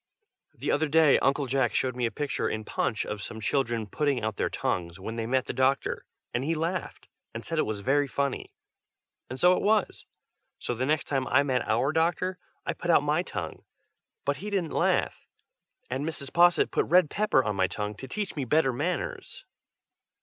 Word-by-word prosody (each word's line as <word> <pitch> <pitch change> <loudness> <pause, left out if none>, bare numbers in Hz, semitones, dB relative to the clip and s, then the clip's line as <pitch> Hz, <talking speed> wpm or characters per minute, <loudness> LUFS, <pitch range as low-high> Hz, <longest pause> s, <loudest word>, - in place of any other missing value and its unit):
The - - -2
other 155 +2 +2
day 155 -1 +5
Uncle 140 +1 +2
Jack 130 -2 +1
showed 130 -2 0
me 125 -2 0
a - - -5
picture 145 -2 -2
in 110 - -3
Punch, 110 - -1
of 105 -1 -5
some 110 - -7
children 120 -1 0
putting 140 +3 -1
out 110 -1 -1
their - - 0
tongues 85 0 -2
when 110 +4 -5
they 115 -1 -3
met 130 +1 +1
the - - -4
doctor, 130 +1 0 0.3
and 120 - 0
he 165 +4 0
laughed, 165 +4 -3 0.3
and 115 - -5
said 165 -1 -2
it - - +1
was 105 -2 -3
very 140 +5 +2
funny, 140 0 -2 0.8
and 130 +1 -6
so 180 +1 +6
it - - -1
was: 210 -1 +1 0.5
so - - -3
then 125 +3 -2
the - - +2
next 155 - +2
time 135 -3 -1
I 135 +4 +4
met 130 -3 0
our 120 +6 +2
doctor, 175 +3 0 0.3
I 170 - -1
put 170 +1 -6
out 160 - +5
my 150 +3 +2
tongue, 90 - -6 0.6
but 140 0 0
he 210 - -6
didn't 190 -6 -1
laugh, - - 0 0.6
and 130 +3 -3
Mrs. 150 -3 -4
Posset 175 0 +5
put - - +1
red 175 -3 +5
pepper 210 -10 +2
on 105 -3 -1
my 95 -1 +2
tongue, 105 +2 -4
to 135 - -8
teach 205 +6 -4
me 145 - -2
better 135 0 +2
manners. 165 +8 -3
135 Hz, 200 wpm, -28 LUFS, 120-160 Hz, 0.8 s, so